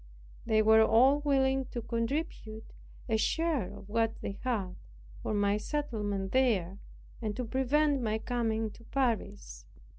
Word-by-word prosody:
They 215 -1 +3
were 220 +1 +6
all 255 +6 +5
willing 270 -2 +1
to 240 - -6
contribute 230 -2 -4 0.3
a 225 -2 +1
share 300 - 0
of - - -11
what 225 +1 0
they 200 - -5
had, 210 -8 -1 0.5
for - - -3
my 205 -1 +2
settlement 210 -7 -3
there, 200 -8 +1 0.4
and 215 -2 -3
to 250 - -3
prevent 275 +3 +1
my 220 -2 0
coming 225 -2 -1
to 230 - -16
Paris. 185 - -2
225 Hz, 140 wpm, -30 LUFS, 210-265 Hz, 0.5 s, were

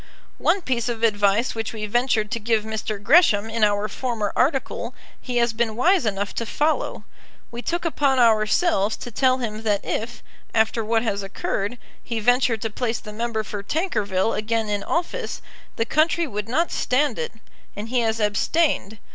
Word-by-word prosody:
One 385 - +2
piece 245 -3 -1
of 230 -1 -4
advice 205 +1 +2
which 225 0 -4
we 215 -1 -4
ventured 220 -1 +1
to 230 - -1
give 220 -1 +1
Mr. 220 -1 -3
Gresham 220 - +4
in 225 -1 0
our 205 0 +2
former 220 -2 -3
article 270 +1 0 0.3
he 250 -2 -3
has 235 -1 +2
been 225 -1 -1
wise 340 - +3
enough 200 -1 -2
to 230 - -3
follow. 305 +6 0 0.5
We 240 0 -5
took 345 +6 -2
upon 280 -4 +2
ourselves 220 - +3
to 245 - -8
tell 255 +2 +3
him 220 -4 -4
that 210 -3 0
if, 240 +2 -3 0.3
after 225 +1 +2
what 225 +1 +1
has 200 -3 -1
occurred, 200 +3 -3 0.3
he 230 -2 -3
ventured 245 -1 +2
to 225 - -2
place 230 0 -1
the 210 - -10
member 225 0 -2
for 205 -1 -5
Tankerville 210 - 0
again 220 0 -1
in 205 -1 -1
office, 355 +9 -2 0.4
the 225 - 0
country 320 +5 +2
would 210 -5 -5
not 330 +8 +1
stand 285 - +1
it; 475 0 -3 0.4
and 210 +2 -6
he 250 0 +1
has 225 -1 0
abstained. 220 - +1
230 Hz, 175 wpm, -23 LUFS, 215-255 Hz, 0.5 s, Gresham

